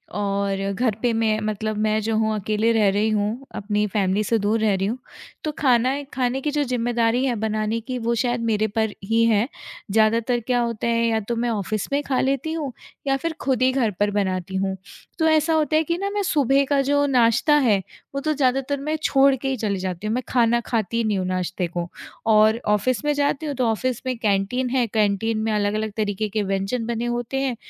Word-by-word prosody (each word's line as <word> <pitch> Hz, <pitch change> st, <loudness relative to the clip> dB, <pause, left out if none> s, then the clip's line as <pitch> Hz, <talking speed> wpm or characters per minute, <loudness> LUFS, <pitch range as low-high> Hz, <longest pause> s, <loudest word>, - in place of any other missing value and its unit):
और 200 Hz, -1 st, -1 dB
घर 225 Hz, 0 st, 0 dB
पे 240 Hz, -, +2 dB
मैं 220 Hz, -1 st, +1 dB
मतलब 215 Hz, 0 st, -2 dB
मैं 215 Hz, 0 st, +2 dB
जो 220 Hz, +1 st, -1 dB
हूँ 220 Hz, 0 st, +1 dB
अकेले 215 Hz, +2 st, +1 dB
रह 210 Hz, -3 st, +4 dB
रही 210 Hz, +3 st, +1 dB
हूँ, 215 Hz, +5 st, -1 dB
अपनी 210 Hz, 0 st, -1 dB
फैमिली 200 Hz, +1 st, 0 dB
से 230 Hz, +2 st, +1 dB
दूर 210 Hz, +3 st, +1 dB
रह 215 Hz, -2 st, +2 dB
रही 190 Hz, 0 st, -1 dB
हूँ, 235 Hz, -, -2 dB, 0.5 s
तो 305 Hz, -, -1 dB
खाना 260 Hz, +1 st, +2 dB
खाने 255 Hz, +1 st, 0 dB
की 295 Hz, +1 st, -1 dB
जो 295 Hz, 0 st, +1 dB
ज़िम्मेदारी 240 Hz, -1 st, 0 dB
है 250 Hz, -3 st, 0 dB
बनाने 215 Hz, +1 st, -1 dB
की 255 Hz, -, -2 dB
वो 235 Hz, +1 st, 0 dB
शायद 240 Hz, 0 st, 0 dB
मेरे 220 Hz, -1 st, +1 dB
पर 220 Hz, 0 st, -1 dB
ही 225 Hz, +3 st, +2 dB
है, 225 Hz, 0 st, +3 dB, 0.4 s
ज़्यादातर 225 Hz, +3 st, +2 dB
क्या 245 Hz, -1 st, +2 dB
होता 235 Hz, -1 st, -2 dB
है 230 Hz, 0 st, +2 dB
या 225 Hz, -1 st, +1 dB
तो 225 Hz, +3 st, -3 dB
मैं 240 Hz, +1 st, -1 dB
ऑफिस 215 Hz, 0 st, -2 dB
में 285 Hz, +1 st, +1 dB
खा 265 Hz, -3 st, 0 dB
लेती 275 Hz, +4 st, 0 dB
हूँ 300 Hz, -5 st, -3 dB, 0.4 s
या 270 Hz, 0 st, +2 dB
फिर 330 Hz, +4 st, -3 dB
खुद 260 Hz, -2 st, 0 dB
ही 255 Hz, 0 st, +4 dB
घर 250 Hz, -5 st, +1 dB
पर 205 Hz, 0 st, +2 dB
बनाती 190 Hz, -2 st, -2 dB
हूँ। 190 Hz, 0 st, -1 dB, 0.4 s
तो 320 Hz, -, +2 dB
ऐसा 315 Hz, +1 st, +3 dB
होता 310 Hz, -1 st, +1 dB
है 315 Hz, -, +4 dB
कि 335 Hz, +2 st, -1 dB
ना 395 Hz, +2 st, -2 dB
मैं 410 Hz, 0 st, -1 dB
सुबह 280 Hz, -6 st, +3 dB
का 280 Hz, -1 st, +3 dB
जो 285 Hz, +1 st, +2 dB
नाश्ता 245 Hz, +3 st, +3 dB
है, 240 Hz, -9 st, +4 dB, 0.4 s
वो 275 Hz, -, -1 dB
तो 310 Hz, +1 st, 0 dB
ज़्यादातर 270 Hz, 0 st, 0 dB
मैं 305 Hz, +3 st, -2 dB
छोड़ 275 Hz, 0 st, +4 dB
के 270 Hz, +1 st, -5 dB
ही 265 Hz, -1 st, -1 dB
चली 200 Hz, -3 st, -1 dB
जाती 185 Hz, +2 st, -4 dB
हूँ 220 Hz, -, 0 dB
मैं 255 Hz, -, -2 dB
खाना 235 Hz, -1 st, +3 dB
खाती 230 Hz, -1 st, -1 dB
ही 235 Hz, -, +1 dB
नहीं 215 Hz, -2 st, 0 dB
हूँ 185 Hz, -, -1 dB
नाश्ते 185 Hz, 0 st, -2 dB
को 175 Hz, 0 st, -4 dB, 0.4 s
और 220 Hz, +1 st, +4 dB
ऑफ़िस 210 Hz, +3 st, +1 dB
में 295 Hz, -, +2 dB
जाती 285 Hz, +1 st, 0 dB
हूँ, 290 Hz, -, -3 dB
तो 255 Hz, -1 st, 0 dB
ऑफ़िस 235 Hz, +2 st, -1 dB
में 255 Hz, -1 st, -2 dB
कैंटीन 220 Hz, +4 st, 0 dB
है, 250 Hz, -1 st, +2 dB
कैंटीन 215 Hz, +1 st, 0 dB
में 220 Hz, -, 0 dB
अलग-अलग 210 Hz, +1 st, 0 dB
तरीके 210 Hz, 0 st, -1 dB
के 210 Hz, 0 st, -1 dB
व्यंजन 195 Hz, +4 st, -2 dB
बने 235 Hz, 0 st, -2 dB
होते 240 Hz, +2 st, -2 dB
हैं, 265 Hz, -3 st, -1 dB
230 Hz, 225 wpm, -23 LUFS, 210-260 Hz, 0.5 s, रह